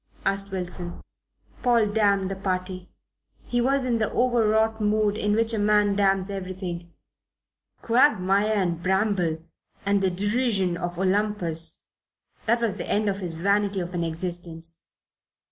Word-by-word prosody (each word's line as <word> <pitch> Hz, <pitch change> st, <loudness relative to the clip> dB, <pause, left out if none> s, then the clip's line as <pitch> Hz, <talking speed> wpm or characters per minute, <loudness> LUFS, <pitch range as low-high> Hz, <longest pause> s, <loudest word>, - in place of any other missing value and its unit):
asked 195 Hz, 0 st, -1 dB
Wilson. 180 Hz, -2 st, -5 dB, 0.6 s
Paul 230 Hz, -4 st, +3 dB
damned 200 Hz, -3 st, +2 dB
the -, -, -2 dB
party. 185 Hz, -1 st, -3 dB, 0.6 s
He 245 Hz, 0 st, 0 dB
was 270 Hz, +1 st, +2 dB
in 235 Hz, -2 st, +1 dB
the 215 Hz, -, 0 dB
overwrought 220 Hz, -2 st, +2 dB
mood 210 Hz, 0 st, +2 dB
in 210 Hz, -1 st, 0 dB
which 230 Hz, +1 st, +1 dB
a 220 Hz, -, 0 dB
man 205 Hz, -1 st, +3 dB
damns 195 Hz, -1 st, +2 dB
everything. 185 Hz, -3 st, -5 dB, 0.9 s
Quagmire 210 Hz, -5 st, +3 dB
and 175 Hz, -5 st, 0 dB
bramble 185 Hz, -4 st, 0 dB, 0.4 s
and 200 Hz, 0 st, +2 dB
the 190 Hz, -, +2 dB
derision 205 Hz, -1 st, 0 dB
of 175 Hz, 0 st, -4 dB
Olympus 185 Hz, -4 st, 0 dB, 0.6 s
that 235 Hz, +2 st, +3 dB
was 210 Hz, -4 st, 0 dB
the -, -, -5 dB
end 210 Hz, 0 st, +1 dB
of 195 Hz, 0 st, -2 dB
his 175 Hz, -4 st, -4 dB
vanity 200 Hz, +3 st, +1 dB
of 175 Hz, 0 st, -4 dB
an 175 Hz, -1 st, -1 dB
existence. 165 Hz, -1 st, -4 dB
195 Hz, 140 wpm, -25 LUFS, 180-215 Hz, 0.9 s, Paul